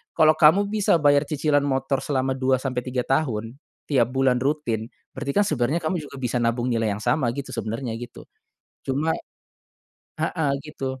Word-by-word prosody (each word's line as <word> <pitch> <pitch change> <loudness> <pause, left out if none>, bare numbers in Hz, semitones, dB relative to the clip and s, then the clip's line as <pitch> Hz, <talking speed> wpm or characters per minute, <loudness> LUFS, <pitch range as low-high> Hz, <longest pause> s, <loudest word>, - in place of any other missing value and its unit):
kalau 155 -1 +5
kamu 160 +7 +5
bisa 205 -5 +2
bayar 145 0 +4
cicilan 145 -1 +1
motor 135 -1 0
selama 130 -2 0
2 130 0 +1
sampe 125 -2 -3
3 125 -1 -3
tahun, 120 -5 -1 0.3
tiap 125 -4 +2
bulan 130 -1 +2
rutin 120 -6 -1 0.2
berarti 140 +1 -3
kan 205 - +5
sebenarnya 140 0 0
kamu 160 +2 -2 0.2
juga 140 - -9
bisa 125 -1 -1
nabung 120 +1 0
nilai 115 -3 +1
yang 100 - -3
sama 130 -7 +1
gitu 135 0 -6
sebenarnya 115 +2 -3
gitu. 120 - -10 0.6
Cuma 145 +5 0 1.1
heeh, 160 -2 0
gitu, 135 -3 -5
135 Hz, 165 wpm, -24 LUFS, 125-150 Hz, 1.1 s, kalau